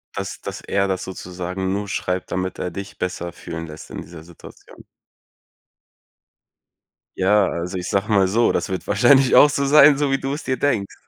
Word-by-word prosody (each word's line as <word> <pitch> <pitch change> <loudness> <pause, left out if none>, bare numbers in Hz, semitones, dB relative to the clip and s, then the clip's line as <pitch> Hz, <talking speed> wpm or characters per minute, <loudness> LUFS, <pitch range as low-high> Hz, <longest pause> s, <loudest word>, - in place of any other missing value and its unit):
Dass - - -5
dass - - -7
er 100 0 0
das 95 -1 -2
sozusagen 90 0 -5
nur 100 +1 -2
schreibt, 90 -2 -3
damit 95 0 -3
er 90 - -4
dich 100 +3 -8
besser 90 -1 -4
fühlen 80 -1 -8
lässt 75 0 -11
in - - -6
dieser 80 -1 -12
Situation. 85 0 -15 2.3
Ja, 100 +1 +3
also 90 +2 -4
ich 90 0 -5
sage 100 +2 -1
mal 100 -2 +4
so, 115 +5 +2
das - - -2
wird 95 -1 -4
wahrscheinlich 125 +6 +4
auch 145 - +8
so 140 -1 -1
sein, 145 0 +7
so 145 -1 0
wie 135 - +1
du 135 +1 -3
es 145 - -6
dir 130 - -2
denkst, 110 -9 -1
95 Hz, 185 wpm, -21 LUFS, 90-120 Hz, 2.3 s, auch